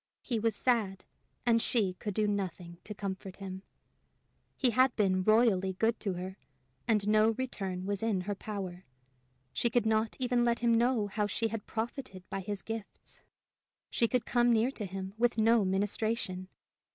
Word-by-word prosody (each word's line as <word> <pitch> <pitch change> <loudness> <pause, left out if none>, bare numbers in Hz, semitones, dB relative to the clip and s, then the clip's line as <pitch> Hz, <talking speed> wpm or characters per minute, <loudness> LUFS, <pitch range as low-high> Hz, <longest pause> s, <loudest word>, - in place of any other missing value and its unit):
He 235 -3 -1
was 225 -1 +1
sad, 210 -7 +1 0.4
and 230 -1 +4
she 210 -7 +1
could 205 +2 -5
do 215 -1 +2
nothing 180 -4 -3
to 210 - -5
comfort 190 -1 -5
him! 190 -1 -7 1.0
He 255 -3 +3
had 255 +1 +4
been 190 -3 +2
royally 215 -3 +4
good 225 +5 +1
to 195 - -1
her, 185 +2 -6 0.5
and 210 -3 +2
no 215 +1 +5
return 195 -8 -3
was 200 -1 -1
in 220 -5 +1
her 205 +3 -2
power. 190 -3 -6 0.7
She 235 - +1
could 235 -1 +2
not 220 0 +1
even 245 -2 +1
let 235 0 +2
him 235 -1 +2
know 235 -1 +3
how 205 +1 -1
she 225 +3 -1
had 220 -1 -5
profited 220 -4 -5
by 195 - -2
his 195 +1 -4
gifts! 225 -2 -8 0.7
She 230 - +3
could 250 0 0
come 240 0 +3
near 230 +3 +3
him 195 -2 -4
with 240 -1 +2
no 225 0 +5
ministration! 195 0 -1
210 Hz, 165 wpm, -31 LUFS, 190-230 Hz, 1.0 s, no